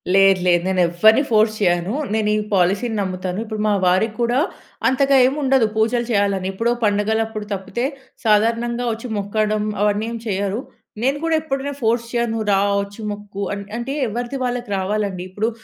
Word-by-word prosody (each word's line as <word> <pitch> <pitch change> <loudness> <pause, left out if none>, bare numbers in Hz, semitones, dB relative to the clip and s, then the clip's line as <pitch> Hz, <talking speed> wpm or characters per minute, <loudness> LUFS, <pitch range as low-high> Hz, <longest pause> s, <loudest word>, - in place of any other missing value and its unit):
లేదు 195 -1 +6
లేదు 175 -1 +4
నేను 190 -1 +2
ఎవ్వరిని 220 - +5
ఫోర్స్ 215 -1 +3
చేయను. 175 +2 +1 0.2
నేను 215 -1 +1
ఈ - - +1 0.2
పాలిసీ‌ని 200 +5 +1
నమ్ముతాను. 185 -1 -3
ఇప్పుడు 215 -1 -4
మా 210 - +3
వారికి 190 +5 +2
కూడా 240 +2 +2 0.5
అంతగా 275 +1 +3
ఏమి 270 +3 +1
ఉండదు 265 -4 +3
పూజలు 235 +2 +1
చేయాలి 200 -1 +2
అని. 185 +1 -3
ఎప్పుడో 230 +5 0
పండగలప్పుడు 215 +1 0
తప్పితే 200 +6 -3 0.4
సాధారణంగా 230 +3 +2
వచ్చి 225 +2 -6
మొక్కడం 210 +1 0 0.2
అవన్నీ 210 +1 +1
ఏమి 230 -1 -6
చెయ్యరు. 200 +3 -1 0.4
నేను 270 +3 +2
కూడా 330 -1 +2
ఎప్పుడైనా 280 -1 -3
ఫోర్స్ 230 +1 +1
చేయను. 235 -1 0
రా 195 0 +3 0.2
వచ్చి 200 +2 -11
మొక్కు 205 -1 -7
అన్ 200 0 -7
అంటే 265 +4 -4
ఎవరిది 240 +4 -4
వాళ్ళకి 245 -3 -3
రావాలండి. 195 -1 -2
ఇప్పుడు 215 +4 -1
215 Hz, 165 wpm, -20 LUFS, 200-235 Hz, 0.5 s, లేదు